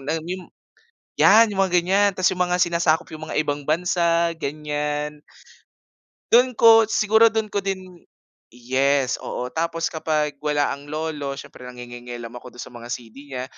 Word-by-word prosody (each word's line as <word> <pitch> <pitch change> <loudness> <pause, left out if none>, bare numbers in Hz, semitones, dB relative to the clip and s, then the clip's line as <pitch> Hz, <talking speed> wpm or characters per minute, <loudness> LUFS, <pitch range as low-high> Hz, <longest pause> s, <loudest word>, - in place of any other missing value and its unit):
na, 150 +4 -2
ah, 160 - -6
mim 180 +1 -6 0.7
yan 220 +2 +7
yung 195 - -4
mga 190 -2 0
ganyan 195 +3 +3
ta's 185 -2 +2
yung 180 - -5
mga 180 0 +2
sinasakop 170 -1 +2
yung 155 0 -7
mga - - -4
ibang 145 -1 -3
bansa 170 0 +1
ganyan. 150 0 -3 1.1
Do'n 250 +1 +5
ko 225 -1 +7
siguro 220 +1 +4
do'n 220 -1 -1
ko 205 - 0
din 185 -2 -5 0.5
yes, 130 +2 +1
oo. 125 0 -5
Tapos 165 0 -2
kapag 155 -2 -2
wala 150 -1 0
ang 140 +1 -7
lolo 150 -2 -4
siyempre 125 -2 -11
nangingielam 120 -1 -9
ako 125 0 -12
do'n 120 - -9
sa - - -13
mga 120 -1 -10
CD 120 -2 -7
niya, 130 -2 -5
155 Hz, 165 wpm, -22 LUFS, 140-180 Hz, 1.1 s, yan